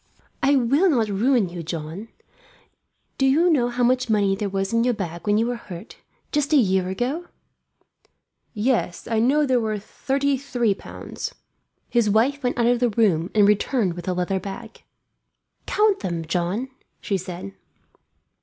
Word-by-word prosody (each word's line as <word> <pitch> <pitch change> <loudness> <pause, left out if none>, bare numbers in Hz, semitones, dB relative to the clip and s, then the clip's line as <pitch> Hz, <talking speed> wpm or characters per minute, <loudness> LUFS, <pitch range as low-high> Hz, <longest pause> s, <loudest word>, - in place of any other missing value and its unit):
"I 280 +1 +4
will 275 +9 +3
not 230 -8 +2
ruin 215 0 +2
you, 175 0 -6
John. 165 +5 -6 1.1
Do 270 - +4
you 330 +6 +4
know 245 -6 +2
how 245 +1 -1
much 255 0 +2
money 200 -3 +2
there 200 +1 -3
was 195 +1 -2
in 230 0 +3
your 245 -1 +1
bag 175 -2 -6
when 205 0 +3
you 225 - +2
were 245 +1 -1
hurt, 185 -1 -10 0.3
just 295 +1 0
a - - +7
year 190 -6 +2
ago 245 - -1
now?" 350 - -15 1.2
"Yes, 220 -5 -1
I 225 -1 +1
know 280 +6 +3
there 255 -2 +2
were 215 -2 -1
thirty 275 +6 -1
three 245 -5 0
pounds." - - -8 0.5
His 235 -3 +2
wife 250 +7 +2
went 250 -2 -1
out 235 - +2
of 240 0 +3
the 245 -1 +2
room 195 -6 +2
and 205 -2 +6
returned 210 -1 +1
with 175 0 -9
a 185 - +1
leather 180 +2 -1
bag. 210 +4 -8 0.9
"Count 420 -2 +2
them, 170 -3 -3
John," 180 +9 -1 0.3
she 200 - -2
said. 175 - -6
225 Hz, 170 wpm, -23 LUFS, 190-255 Hz, 1.2 s, a